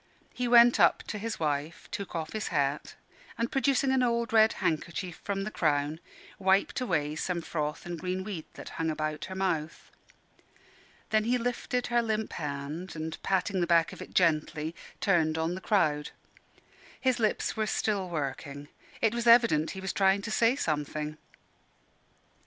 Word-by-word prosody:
He 250 -1 -2
went 240 0 +7
up - - +4
to 210 - -3
his 225 +1 -4
wife, 150 +3 -2
took 200 -4 -5
off 160 -1 -4
his 215 -1 -2
hat, 145 -3 -1 0.4
and 230 +1 -1
producing 270 0 +2
an 265 -1 +3
old 235 -2 0
red 220 0 +6
handkerchief 170 +2 -2
from 195 -1 -2
the 215 - -4
crown, 150 -2 0 0.4
wiped 190 +5 +2
away 150 -10 0
some 175 +3 -2
froth 155 -2 -3
and 175 -1 -5
green 185 +1 -2
weed 185 -6 -5
that - - -8
hung 160 - +1
about 155 -1 -2
her 190 - -7
mouth. 165 -5 -2 1.2
Then 215 0 +3
he 245 +2 +2
lifted 245 +1 -2
her 240 - +5
limp 220 -1 -2
hand, 150 +4 -5
and 160 0 -5
patting 190 0 0
the 175 - +1
back 170 -1 +3
of - - -10
it - - -10
gently, 160 -2 +1 0.3
turned 160 -5 +2
on 160 +2 0
the 185 - -6
crowd. 155 -9 +1 0.9
His 255 -2 +1
lips 215 -2 0
were 220 -1 0
still 200 -2 -1
working. 145 -2 -4 0.3
It 225 -1 +3
was 235 0 -2
evident 230 -10 +6
he - - -5
was 190 -1 -3
trying 195 0 +3
to 225 - -4
say 230 +3 +3
something. 150 - -2
185 Hz, 165 wpm, -29 LUFS, 155-220 Hz, 1.2 s, went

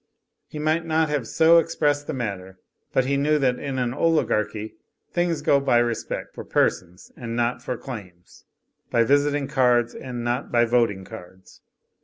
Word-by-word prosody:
He - - -9
might 155 +2 0
not 160 -1 +1 0.2
so 165 +6 +5
have 165 - +5
expressed 145 -1 -1
the - - -3
matter, 100 -6 -5 0.3
but 130 - +2
he 140 +1 +1
knew 150 +2 +2
that 130 -3 +1
in 135 -2 -4
an 125 -1 -1
oligarchy 110 -9 0 0.4
things 175 -2 -1
go 140 - +4
by 135 -3 +2
respect 120 -1 -2
for - - -8
persons 90 0 -1
and 115 -1 -6
not 120 +1 0
for 125 - -4
claims; 90 -10 -11 0.4
by 115 - +3
visiting 145 +2 +2
cards 125 -4 +2
and 125 -2 -6
not 120 +3 -2
by 120 -1 +4
voting 115 -5 +1
cards. 95 -3 -13
125 Hz, 165 wpm, -24 LUFS, 115-145 Hz, 0.4 s, so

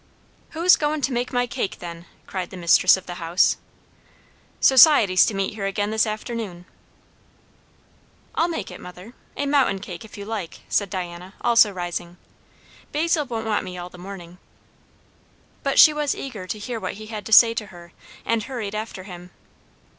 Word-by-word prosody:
"Who's 355 +2 +6
goin' 300 0 -1
to 265 0 -1
make 245 +1 -2
my 245 -1 +1
cake, 235 -5 -4
then?" 170 0 -9 0.2
cried 185 -2 -5
the 190 - -10
mistress 180 +2 +5
of 190 - -11
the 175 0 -8
house. 170 +2 +2 1.0
"Society's 260 - +6
to 215 - -2
meet 195 +1 -1
here 200 -2 -3
again 205 +1 -2
this 220 0 +2
afternoon." 215 -4 -5 1.7
"I'll 330 - +1
make 320 - -4
it, - - -10
mother 180 +6 -11 0.2
a 285 - -1
mountain 280 -8 +2
cake, 185 -3 -8
if 220 - -13
you 200 - -7
like," 210 -6 -6
said 200 -2 0
Diana, 180 0 -6
also 230 -3 +5
rising. 175 -1 -5 0.7
"Basil 310 0 +1
won't 225 -2 -4
want 215 -2 0
me 180 -1 -7
all 175 0 -7
the 180 - -13
morning." 180 -2 -10 1.2
But 275 - -1
she 310 - +9
was 300 -1 -1
eager 220 -9 -7
to 215 - -4
hear 230 +2 -5
what - - -4
he 215 +1 -10
had 215 -1 -7
to - - -9
say 230 +1 +8
to 215 -2 -4
her, 175 -2 -14 0.3
and 230 -1 +1
hurried 230 -6 -5
after 215 -3 -5
him. 180 -2 -10
205 Hz, 175 wpm, -23 LUFS, 180-240 Hz, 1.7 s, she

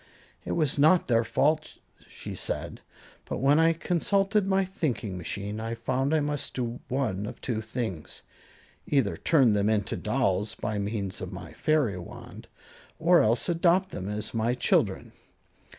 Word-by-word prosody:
"It - - -2
was 150 -3 +1
not 160 +5 +5
their 115 -1 +3
fault," 150 +7 0 0.3
she - - -8
said, - - -4 0.4
"but - - -4
when 140 +3 +4
I 165 0 +5
consulted 195 +4 +1
my 195 0 +2
thinking 130 - -3
machine 100 +4 -4
I 115 +1 -3
found 130 +4 -1
I 160 - +3
must 145 -1 -3
do 120 -1 -3
one 110 -7 -1
of - - -8
two 115 -4 -2
things 110 - -5 0.6
either 135 -9 +2
turn 135 -9 +3
them 105 +1 +2
into 105 -3 0
dolls 100 +3 0
by 105 -1 -3
means 100 -2 -3
of 95 -1 -5
my 90 -3 -9
fairy 140 -12 +1
wand, 85 - -10 0.5
or 170 +2 +5
else 115 +2 +2
adopt 175 +2 +2
them 95 +2 -5
as 105 +1 -4
my 115 +2 +1
children. 125 - +1
120 Hz, 155 wpm, -27 LUFS, 105-155 Hz, 0.6 s, not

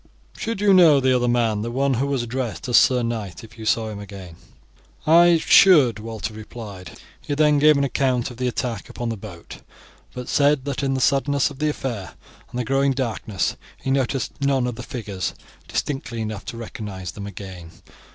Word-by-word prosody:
"Should 225 -3 -4
you 205 -1 +5
know 165 -6 +7
the 130 -1 +3
other 125 -1 +1
man, 115 -3 +1
the 115 - -3
one 135 +3 +1
who 130 +3 0
was 135 -3 -1
addressed 120 -5 -4
as 120 - +1
sir 125 -2 +5
knight, 110 -7 -4
if 110 - -13
you 110 - -6
saw 110 0 +1
him 105 -1 -7
again?" 95 -4 -10 0.7
"I 170 +2 +6
should," 155 - +6
Walter 110 0 -5
replied. 105 -5 -9 0.3
He 145 - -3
then 150 -1 +4
gave 150 0 +6
an 140 - +1
account 130 -2 0
of 120 - -12
the 125 0 -1
attack 120 -4 -3
upon 120 -1 -4
the 115 - -2
boat, 95 -5 -10 0.6
but 125 -1 -6
said 145 -2 +2
that 140 -2 -3
in 135 -1 0
the 130 - -1
suddenness 140 +1 +2
of 135 - -12
the 155 0 +1
affair 120 -10 -5 0.3
and 125 - -5
the 125 - -1
growing 135 +3 +2
darkness 110 -7 -2 0.2
he 135 - -3
noticed 135 -1 0
none 135 -2 +2
of 125 - -2
the 120 - -8
figures 105 - -5 0.3
distinctly 135 -5 -3
enough 105 -3 -5
to 115 - -6
recognize 105 -6 -6
them 100 -1 -8
again. 95 -4 -9
125 Hz, 195 wpm, -22 LUFS, 110-140 Hz, 0.7 s, know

